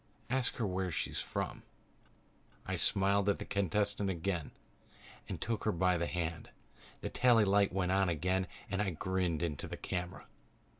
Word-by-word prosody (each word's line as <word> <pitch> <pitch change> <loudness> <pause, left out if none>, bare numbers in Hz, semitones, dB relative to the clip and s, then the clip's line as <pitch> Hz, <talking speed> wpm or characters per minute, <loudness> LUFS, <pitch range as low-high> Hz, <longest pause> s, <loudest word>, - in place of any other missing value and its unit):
"Ask 130 -1 +1
her 115 - -1
where 95 -1 -1
she 80 - -2
comes - - -2
from." - - -3 1.0
I - - -1
smiled 100 +1 +3
at 100 - +2
the - - -6
contestant 100 +1 +1
again 85 -2 -1 0.8
and - - -3
took 115 -2 -2
her 110 - +3
by 90 0 +3
the 85 - 0
hand. 85 -1 -3 0.5
The - - -3
tally 120 -4 +5
light 100 0 +4
went 90 -1 0
on 95 -1 +3
again 90 +3 +1 0.2
and 100 +1 -1
I 100 - +1
grinned 90 -1 -1
into 75 -5 -2
the - - -6
camera. 90 -1 -4
95 Hz, 165 wpm, -34 LUFS, 90-100 Hz, 1.0 s, tally